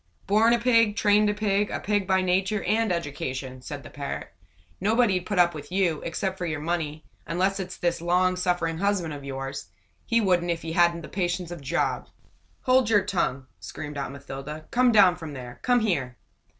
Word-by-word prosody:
"Born 215 +3 +4
a - - +4
Pig 230 -3 +3
trained 210 -1 +4
a - - +1
Pig 205 -1 +1
a - - -3
Pig 205 -2 0
by 190 -1 +3
nature 190 +3 +1
and 220 -1 +1
education!" 130 -5 -4
said 140 +1 -7
the - - -11
parrot. 140 -1 -5 0.5
"Nobody'd 205 -4 +2
put 205 - -2
up 175 -1 +5
with 150 +1 -9
you, 180 -5 +1
except 190 +3 -3
for 175 - -2
your 160 -2 -2
money; 155 -1 -3 0.2
unless 190 +3 0
it's 185 -1 -5
this 170 -1 -1
long 180 +2 +2
suffering 175 -3 -1
husband 195 -5 0
of 145 -1 -8
yours. 135 -5 -5 0.4
He 230 - +3
wouldn't, 180 -4 +2
if 170 -1 -2
he 165 - -4
hadn't 170 0 +3
the - - -7
patience 175 -2 -2
of 175 -3 -7
Job!" 140 - -1 0.5
"Hold 255 -3 +3
your 205 -3 +4
tongue!" 140 -9 -1
screamed 145 - -7
Aunt 140 - -4
Mathilda. 140 +2 -8
"Come 250 0 +4
down 190 -5 +6
from 160 -4 -7
there! 125 -2 -9
Come 245 -1 +3
here!" 140 - -1
175 Hz, 190 wpm, -26 LUFS, 150-205 Hz, 0.5 s, down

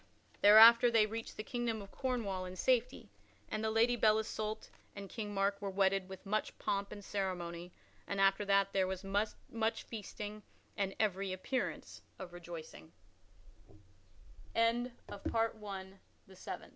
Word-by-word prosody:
Thereafter 230 +3 +9
they 225 -2 +4
reached 225 +1 -6
the 215 - -4
kingdom 240 -2 -2
of 200 -1 -10
Cornwall 225 -8 -2
in 180 0 -7
safety, 250 +4 0 0.4
and 215 0 -3
the 220 - +1
Lady 230 +2 +3
Belle 215 -2 +4
Isoult 215 0 -3 0.3
and 200 -1 -7
King 210 -3 -5
Mark 200 0 0
were 200 - -2
wedded 190 0 +1
with 190 +1 -10
much 215 +2 -2
pomp 200 0 -2
and 205 -1 -9
ceremony 180 -3 -3 0.4
and 200 - -3
after 195 +1 +4
that 195 0 +3
there 190 -1 +2
was 190 0 -4
much 220 +3 -2
feasting 210 -1 -7 0.4
and 195 -1 -1
every 195 -2 0
appearance 215 +8 -3 0.2
of 180 -2 -9
205 Hz, 125 wpm, -34 LUFS, 195-220 Hz, 0.4 s, Thereafter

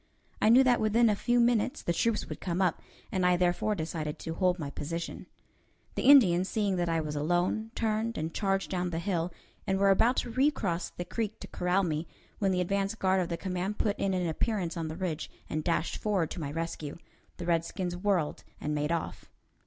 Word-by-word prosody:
I 215 - +5
knew 250 +4 +8
that 250 -2 +3
within 220 +1 +4
a - - +1
few 240 +4 +1
minutes 235 0 +2
the 170 - 0
troops 225 +4 +1
would - - -7
come 180 -1 -2
up, 185 -4 +1 0.3
and 185 -2 0
I 180 0 +4
therefore 180 +4 +1
decided 160 -3 -3
to 165 - -5
hold 180 +1 +2
my 145 -5 -5
position. 165 +4 -5 0.7
The - - -2
Indians, 190 -10 +7
seeing 205 -3 0
that 175 -1 0
I 165 0 +1
was 150 -1 -3
alone, 175 +8 0
turned, 225 +1 -1
and 160 +1 -3
charged 195 -2 0
down 180 -1 -1
the 165 - -3
hill, 175 -1 -1 0.4
and 190 - +2
were 195 0 +4
about 230 +6 +4
to 240 - -1
recross 230 - +1
the 175 - -6
creek 220 +2 -3
to - - -7
corral 180 +2 +1
me, 160 -1 -2 0.3
when 195 -2 +2
the 180 -1 +1
advance 195 +3 0
guard 190 -3 +2
of 175 - -2
the 170 - -2
command 185 +2 -3
put 210 -2 +1
in 195 -1 +1
an 180 -1 0
appearance 175 +1 -1
on 165 -2 -3
the 160 +1 -6
ridge, 170 -4 -3 0.2
and 155 0 -2
dashed 165 0 0
forward 195 -7 0
to - - -5
my 140 -2 -3
rescue. 165 -2 -4 0.4
The - - -5
redskins 175 +2 -1
whirled 180 -5 0 0.2
and 150 - -2
made 150 +1 -1
off. 170 -1 -3
180 Hz, 210 wpm, -30 LUFS, 165-210 Hz, 0.7 s, knew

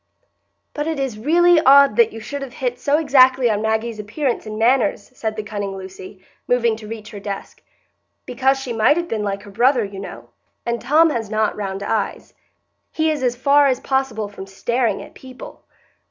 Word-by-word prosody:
"But 295 +1 -3
it 320 -3 -2
is 260 -6 -3
really 345 +6 +4
odd 280 -1 +6
that 470 -2 +5
you 225 - -8
should 280 +6 -6
have 270 -2 -7
hit 250 -2 -3
so 285 +3 +2
exactly 260 -5 +4
on 210 0 -1
Maggie's 220 0 -1
appearance 235 +3 -3
and 215 0 -6
manners," 235 -2 +1
said 220 -3 -4
the 215 - -4
cunning 205 -2 -5
Lucy, 190 0 -11 0.2
moving 235 -2 +2
to 215 -1 -11
reach 215 -1 -8
her 205 - -8
desk, 200 0 -7 0.6
"because 265 +2 +1
she 255 -3 -5
might 225 +7 +3
have 345 0 -2
been 225 -9 -2
like 200 -1 -3
her 205 - -12
brother, 245 +3 +3
you 195 -1 -8
know; 195 - -9 0.4
and 235 -1 -2
Tom 310 +5 +4
has 225 -6 -3
not 215 0 0
round 195 -1 -4
eyes; 210 0 -3
and - - -41 0.5
he 315 0 +1
is 300 -3 -3
as 245 -1 0
far 280 +3 +4
as 260 -2 +1
possible 265 -7 -1
from 200 -1 -10
staring 230 +3 -1
at - - -14
people." 260 -1 -12
235 Hz, 200 wpm, -20 LUFS, 210-270 Hz, 0.6 s, odd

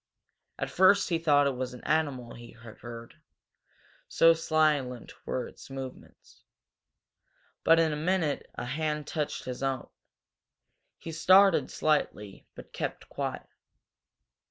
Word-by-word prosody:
At - - -4
first 190 +2 +4
he 165 -2 +1
thought 145 -3 +4
it 140 -2 0
was 125 0 -4
an 125 - -13
animal 140 -6 -1
he 120 0 -12
had 115 -1 -14
heard, 115 -1 -10 0.9
so 165 0 +5
silent 155 -6 0
were 125 - -2
its - - -14
movements. 135 -1 -10 1.2
But 165 0 +5
in 160 -2 +2
a - - -2
moment 160 -1 -1
a - - -5
hand 150 +3 -2
touched 150 0 -3
his 125 0 -6
own. 135 -2 -2 1.1
He 165 - -8
started 185 +3 +5
slightly, 105 -10 -1
but - - -12
kept - - -5
quiet. - - -4
150 Hz, 130 wpm, -29 LUFS, 125-165 Hz, 1.2 s, so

